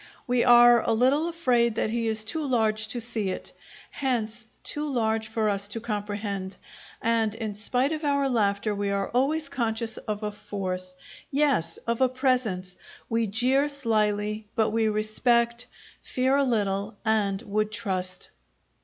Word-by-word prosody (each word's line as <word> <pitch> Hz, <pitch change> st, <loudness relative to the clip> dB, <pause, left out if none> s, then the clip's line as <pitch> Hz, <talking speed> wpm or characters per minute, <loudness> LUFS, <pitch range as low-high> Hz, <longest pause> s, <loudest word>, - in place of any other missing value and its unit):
We 245 Hz, -1 st, +2 dB
are 240 Hz, -1 st, +7 dB
a 230 Hz, -, +1 dB
little 265 Hz, +8 st, +3 dB
afraid 245 Hz, -9 st, +2 dB
that 215 Hz, -, 0 dB
he 230 Hz, 0 st, -1 dB
is 220 Hz, -1 st, -2 dB
too 315 Hz, +7 st, -2 dB
large 220 Hz, -5 st, +1 dB
to 240 Hz, +3 st, -2 dB
see 225 Hz, -4 st, -3 dB
it; 185 Hz, -, -5 dB, 0.4 s
hence 235 Hz, -4 st, -2 dB, 0.2 s
too 295 Hz, 0 st, -3 dB
large 220 Hz, -3 st, 0 dB
for 220 Hz, 0 st, 0 dB
us 200 Hz, -1 st, -1 dB
to 210 Hz, +3 st, -4 dB
comprehend, 205 Hz, -3 st, -4 dB, 0.5 s
and 225 Hz, -2 st, +2 dB
in 220 Hz, -2 st, -4 dB
spite 250 Hz, +7 st, 0 dB
of 310 Hz, 0 st, -3 dB
our 280 Hz, -1 st, +2 dB
laughter 210 Hz, -4 st, +1 dB
we 200 Hz, 0 st, -1 dB
are 200 Hz, 0 st, -1 dB
always 280 Hz, +5 st, +1 dB
conscious 230 Hz, -4 st, -2 dB
of 210 Hz, 0 st, -4 dB
a 210 Hz, -, -1 dB
force 185 Hz, -3 st, -5 dB, 0.3 s
yes, 275 Hz, -, +1 dB
of 235 Hz, +1 st, -1 dB
a 260 Hz, -, +5 dB
presence! 250 Hz, -9 st, 0 dB, 0.3 s
We 230 Hz, -1 st, +1 dB
jeer 255 Hz, +7 st, +2 dB
slyly, 215 Hz, -5 st, 0 dB
but 220 Hz, -1 st, +2 dB
we 225 Hz, 0 st, +2 dB
respect, 235 Hz, +3 st, +1 dB, 0.3 s
fear 260 Hz, +1 st, +1 dB
a 280 Hz, -, +3 dB
little, 205 Hz, -4 st, 0 dB
and 205 Hz, -3 st, +1 dB
would 215 Hz, +1 st, -1 dB
trust. 185 Hz, -5 st, -4 dB
225 Hz, 155 wpm, -26 LUFS, 210-250 Hz, 0.5 s, are